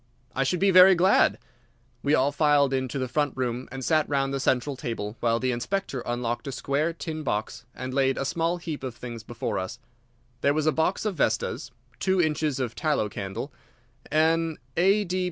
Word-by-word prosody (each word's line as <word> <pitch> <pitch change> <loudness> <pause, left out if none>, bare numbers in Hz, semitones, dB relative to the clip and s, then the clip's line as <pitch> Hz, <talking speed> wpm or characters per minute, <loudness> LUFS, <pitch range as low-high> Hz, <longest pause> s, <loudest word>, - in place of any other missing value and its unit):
"I 135 - +2
should 150 +7 0
be 195 0 +4
very 185 +1 +8
glad." 185 +3 +4 0.6
We 145 +2 +3
all 135 +2 +2
filed 145 -2 +3
into 130 +1 -1
the 130 -1 -1
front 145 +2 -1
room 125 0 -2
and 130 -1 -5
sat 155 -2 +2
round 135 -1 0
the 135 - -1
central 130 +2 +1
table 115 -4 -4
while 115 -1 +1
the 130 +1 0
Inspector 130 +3 -2
unlocked 120 +1 -2
a - - -2
square 140 +5 0
tin 160 -1 -5
box 110 -3 -3
and 130 0 -5
laid 135 -1 +2
a 135 - -1
small 165 +4 0
heap 160 -5 -6
of 130 -3 -5
things 120 -2 -7
before 115 +1 -3
us. 95 +5 -5 0.6
There 140 +1 +3
was 155 -1 0
a 155 - +4
box 160 +7 0
of 210 - 0
vestas, - - 0 0.3
two 190 -1 +1
inches 155 -4 +1
of 125 -4 -2
tallow 150 -7 0
candle, 100 +7 -5 0.6
an 160 +1 +2 0.2
A. 195 +4 +3
140 Hz, 190 wpm, -26 LUFS, 125-160 Hz, 0.6 s, very